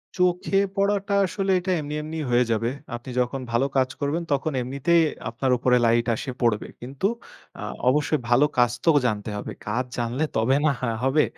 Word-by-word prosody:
চোখে 180 +1 +1 0.2
পড়াটা 200 0 +1
আসলে 195 +1 -1
এটা 185 +1 -2
এমনি 150 0 -5
এমনি 155 +1 -6
হয়ে 120 +1 +4
যাবে। 115 +1 +1 0.3
আপনি 120 +2 -9
যখন 125 +2 -1
ভালো 120 +3 +2
কাজ 130 -1 +3
করবেন, 145 +4 -1
তখন 140 +3 +1
এমনিতেই 140 +7 +2 0.3
আপনার 125 +3 -1
উপরে 125 +1 +3
লাইট 115 0 +3
আসে 130 +4 -5
পড়বে। 115 -4 +1
কিন্তু 135 +8 -5 0.5
আ - - -6 0.3
অবশ্যই 150 +3 +2
ভালো 120 +4 +5
কাজ 120 -1 +4
তো - - +3 0.2
জানতে 105 -2 -1
হবে। 100 - -5 0.2
কাজ 120 +5 -1
জানলে 120 +4 -1
তবে 115 +4 +3
না - - +5
হা 125 - 0
হবে। 135 +3 +3
130 Hz, 180 wpm, -24 LUFS, 120-155 Hz, 0.5 s, ভালো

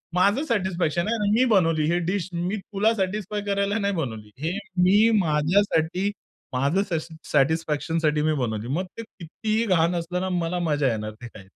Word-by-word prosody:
माझं 200 +10 +3
सॅटिस्फॅक्शन 185 - 0
आहे. 210 -3 0
मी 250 +3 +4
बनवली 165 -5 +3
हे 175 - +2
डीश. 185 -1 -1
मी 180 +5 -2
तुला 205 +3 0
सॅटिस्फाय 205 +1 -2
करायला 200 +1 0
नाही 200 0 0
बनवली. 110 -9 -4
हे 180 +4 -1 0.3
मी 205 +5 +5
माझ्यासाठी, 170 +3 +1 0.4
माझं 140 +10 +1
सश 165 -2 -2 0.2
सॅटिस्फॅक्शनसाठी 155 +1 +1
मी 155 0 +2
बनवली. 115 -5 -2
मग 170 +8 -1
ते 230 - -5
कितीही 215 +4 -3
घाण 175 -3 +2
असलं 175 +2 -2
ना, 190 - -2
मला 175 0 -1
मजा 145 -2 +2
येणार 110 0 -4
ते 120 - -7
खायला. 100 -4 -13
175 Hz, 165 wpm, -24 LUFS, 155-200 Hz, 0.4 s, मी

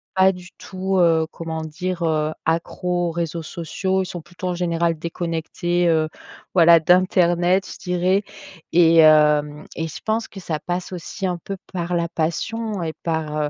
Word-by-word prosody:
pas 190 0 +5
du 180 0 -11
tout, 190 0 -3
heu, 165 -2 +4
comment 160 -1 -5
dire, 170 +3 -4
heu, 155 -1 0
accros 175 +2 -1
aux - - -3
réseaux 165 0 -3
sociaux. 185 +4 -2
Ils - - -5
sont 175 -1 -7
plutôt, 175 +3 -6
en 175 - -2
général, 170 -2 0
déconnectés, 170 +1 -2
heu, 160 -1 +2 0.4
voilà, 170 -2 +7
d'internet, 180 +1 +3
je - - -11
dirais 180 +2 +1 0.5
et 165 -1 +5
hem 150 -1 +5
et 165 0 -2
je 155 - -8
pense 225 +1 0
que 195 - -11
ça 160 -3 -3
passe 180 +3 -4
aussi, 185 +2 -5
un 180 -2 -1
peu, 195 +4 -6 0.2
par 175 0 -2
la 170 0 0
passion 200 +6 -2
et 160 - -2
par, 160 -2 -2
heu, 145 - -1
170 Hz, 175 wpm, -22 LUFS, 160-180 Hz, 0.5 s, voilà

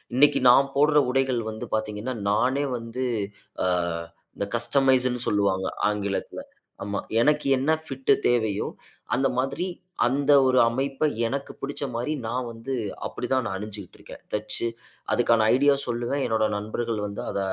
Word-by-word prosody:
இன்னைக்கு 140 +1 +5
நான் 135 +2 +4
போடுற 150 +1 +4
உடைகள் 130 -2 +1
வந்து 110 - -6
பார்த்தீங்கன்னா, 110 +3 -3 0.2
நானே 130 +7 +2
வந்து 115 +3 -4 0.6
ஆ - - +2 0.7
இந்த 100 - -1
கஸ்டமைஸ்னு 130 0 +2
சொல்வாங்க 100 -2 +1 0.2
ஆங்கிலத்துல. 100 -2 -3 0.4
ஆமா, 100 0 -2 0.2
எனக்கு 150 +4 +3
என்ன 135 +4 +1 0.2
பிட் 135 -2 -1
தேவையோ, 110 -4 +1 0.5
அந்த 135 +2 +3
மாதிரி 135 +7 -1 0.4
அந்த 140 +3 +1 0.2
ஒரு 130 - +3
அமைப்ப 135 +4 -2 0.2
எனக்கு 140 +3 -4
பிடிச்ச 140 +1 -4
மாரி 120 +6 -2
நான் 120 +2 -2
வந்து 115 +4 -6 0.3
அப்டி - - -5
தான் 130 -1 +3
நான் 95 - -3
அணிஞ்சிட்டு 105 -2 -8
இருக்கேன் - - -12
தச்சு. 110 +2 -2 0.4
அதுக்கான 115 -2 +3
ஐடியா 145 +2 +5
சொல்லுவேன். 120 +4 -2
என்னுடைய 110 -2 +1
நண்பர்கள் 110 +2 -3
வந்து 100 - -6
அத - - -2
120 Hz, 140 wpm, -25 LUFS, 110-135 Hz, 0.7 s, இன்னைக்கு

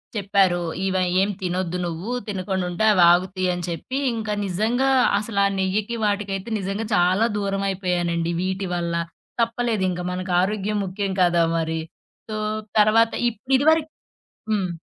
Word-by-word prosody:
చెప్పారు. 195 -3 +2 0.2
ఇవ 190 0 -1 0.3
"ఏం 200 - +1
తినొద్దు 180 -1 -2
నువ్వు. 170 +7 -4 0.2
తినకుండ 190 -1 -2
ఉంటే 215 +5 0
అవి 180 -2 +5
ఆగుతయి" 185 +1 +1
అని 175 0 -4
చెప్పి 175 +10 -4 0.2
ఇంకా 220 -2 -3
నిజంగా 225 +8 +1 0.3
అసల 210 -1 -2
ఆ 200 - -2
నెయ్యకి 205 +5 -1
వాటికైతే 200 0 -2
నిజంగా 195 +3 -3
చాలా 185 +5 +3
దూరమైపోయానండి. 180 -4 -1
వీటి 190 +1 -2
వల్ల 170 -1 -2 0.5
తప్పలేదింక 225 -6 0
మనకు 185 0 -4
ఆరోగ్యం 210 +1 -1
ముఖ్యం 195 +1 -3
కదా! 175 -1 +4
మరి. 160 0 -1 0.5
సో 215 - -3 0.4
తర్వాత 225 +2 +4 0.2
ఇప్పుడు 245 +4 -5
ఇదివరకు 315 +2 +3 0.6
హ్మ్. 195 -4 0
195 Hz, 135 wpm, -23 LUFS, 180-215 Hz, 0.6 s, అవి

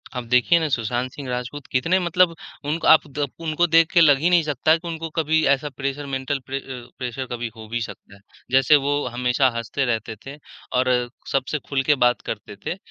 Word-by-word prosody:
अब 125 -2 -4
देखिए 125 +8 +4
ना 160 - 0
सुशांत 120 0 -1
सिंह 140 -1 -8
राजपूत 125 +3 -5
कितने 165 +8 +2
मतलब 175 -1 +2 0.3
उनक 155 +3 -2
आप 160 - +6
द 145 +1 -2 0.2
उनको 155 +3 +2
देख 165 0 +4
के 175 - +5
लग 145 -4 +6
ही 165 +5 +2
नहीं 175 -2 +4
सकता 155 +2 +2
कि 170 - -10
उनको 165 -1 -5
कभी 160 0 +2
ऐसा 145 +2 -3
प्रेशर 140 +1 -4
मेंटल 135 +2 -2
प्रे 135 +1 -3
अ, 125 -3 -9
प्रेशर 130 +1 -4
कभी 120 0 -3
हो 110 -1 -11
भी 120 0 -2
सकता 100 -2 -9
है। 100 - -20 0.3
जैसे 135 +3 +5
वो 145 - +1
हमेशा 125 +2 +1
हँसते 115 +4 -2
रहते 110 -2 -2
थे 140 +2 -8 0.4
और 130 0 +2 0.4
सबसे 135 +3 -1
खुल 135 -2 0
के 150 - +6
बात 120 - +2
करते - - -6
थे - - -2
135 Hz, 210 wpm, -22 LUFS, 125-155 Hz, 0.4 s, आप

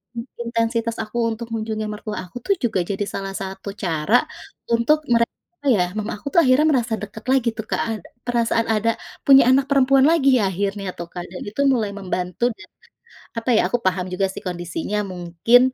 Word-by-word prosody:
in 230 - -3 0.2
intensitas 230 0 -1
aku 215 +2 -7
untuk 230 +1 -5
mengunjungi 220 -1 -3
mertua 210 0 -5
aku 190 - -9
tuh 395 - +3
juga 215 -5 +1
jadi 200 +3 -2
salah 195 0 -4
satu 195 +1 -6
cara 165 +5 +1 0.6
untuk 235 +7 +3
mere 235 0 +5 0.4
apa 285 - +1
ya, 180 - +3
mama 210 0 -3
aku 245 - -10
akhirnya 270 +2 +4
merasa 235 -4 +1
dekat 210 +2 -8
lagi 265 -3 +3
tuh, 220 - -4
Kak, - - 0
ad 220 -4 -3 0.2
perasaan 230 -1 +1
ada 220 +1 +1 0.4
punya 275 -1 +8
anak 265 +1 +4
perempuan 275 -1 +4
lagi 315 -5 +4
ya 195 - +2
akhirnya 195 +2 -2
tuh, 170 - -5
Kak, 175 - -4
dan 180 - -7
itu 245 +7 -3
mulai 215 -4 0
membantu 185 +1 -4
dan, - - -12 0.7
apa 230 +2 -5
ya, - - +5
aku 245 - +2
paham 180 0 +1
juga 195 +1 +1
sih - - -8
kondisinya. 175 +3 -3
Mungkin 175 +7 +3
220 Hz, 185 wpm, -22 LUFS, 195-240 Hz, 0.7 s, punya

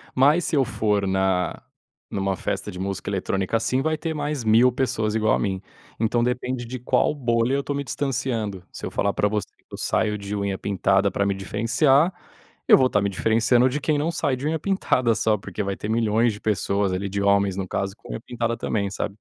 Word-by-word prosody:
Mas 145 +6 +4
se - - 0
eu 135 -2 +3
for 105 -3 0
na 95 -1 0 0.5
em - - -5
uma 95 -1 -1
festa - - -3
de 90 - -9
música 95 +1 -3
eletrônica 95 +2 -1
assim 130 +4 0
vai 155 +1 0
ter 160 0 -3
mais 145 -2 -2
1000 115 +4 +5
pessoas 115 -4 -1
igual 110 -1 +2
a - - -1
mim. 95 -2 -2 0.4
Então 115 +1 +1
depende 125 0 -2
de 125 +1 -6
qual 125 +4 +2
bolha 120 -2 +1
eu - - +1
estou 140 0 -3
me 140 - -2
distanciando. 115 -8 -2
Se - - -7
eu - - -3
falar 100 - +1
para 105 - +1
você 105 -2 -2
que - - -36
eu - - -8
saio 105 -1 0
de 100 0 -6
unha 100 -1 -2
pintada 100 0 +1
para 100 - 0
me 100 -1 0
diferenciar, 125 - +2 0.6
eu - - +8
vou 130 - +4
estar 105 -5 +1
me 100 - 0
diferenciando 115 +5 +3
de 150 +4 -2
quem 150 -2 +1
não 155 +3 0
sai 145 -5 0
de 140 - -6
unha 160 +1 0
pintada 130 - +1
só, 110 -1 +2
porque 100 +1 -6
vai 100 0 -2
ter 105 - -6
milhões 115 +1 +2
de 105 - -10
pessoas 100 -2 0
ali 100 +2 -2
de 100 +1 -2
homens 100 -1 +2
no 95 - -3
caso 95 +1 -2
com - - -15
unha 110 - -5
pintada 115 -1 -2
também, 100 -3 -1
sabe? 100 0 -4
110 Hz, 225 wpm, -24 LUFS, 100-130 Hz, 0.6 s, eu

